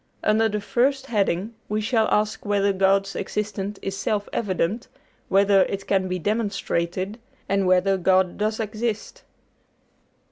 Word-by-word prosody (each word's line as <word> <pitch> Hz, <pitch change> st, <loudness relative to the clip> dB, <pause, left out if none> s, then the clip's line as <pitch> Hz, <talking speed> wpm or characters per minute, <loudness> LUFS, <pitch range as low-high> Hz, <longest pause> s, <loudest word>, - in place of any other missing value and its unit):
Under 220 Hz, +1 st, +3 dB
the 210 Hz, 0 st, -2 dB
first 265 Hz, +5 st, +1 dB
heading 205 Hz, -3 st, 0 dB, 0.2 s
we 210 Hz, +1 st, 0 dB
shall 220 Hz, 0 st, +1 dB
ask 215 Hz, +1 st, 0 dB
whether 200 Hz, -1 st, +1 dB
God's 195 Hz, +1 st, +2 dB
existence 205 Hz, 0 st, -3 dB
is 195 Hz, -, -3 dB
self 205 Hz, +1 st, -1 dB
evident, 200 Hz, +1 st, -1 dB, 0.4 s
whether 195 Hz, 0 st, +5 dB
it 195 Hz, 0 st, -4 dB
can 190 Hz, -1 st, +1 dB
be 185 Hz, 0 st, -2 dB
demonstrated, 200 Hz, -1 st, -2 dB, 0.3 s
and 195 Hz, -1 st, +1 dB
whether 185 Hz, +1 st, +3 dB
God 185 Hz, 0 st, +2 dB
does 215 Hz, +2 st, -1 dB
exist." 220 Hz, 0 st, -3 dB
200 Hz, 135 wpm, -24 LUFS, 190-215 Hz, 0.4 s, whether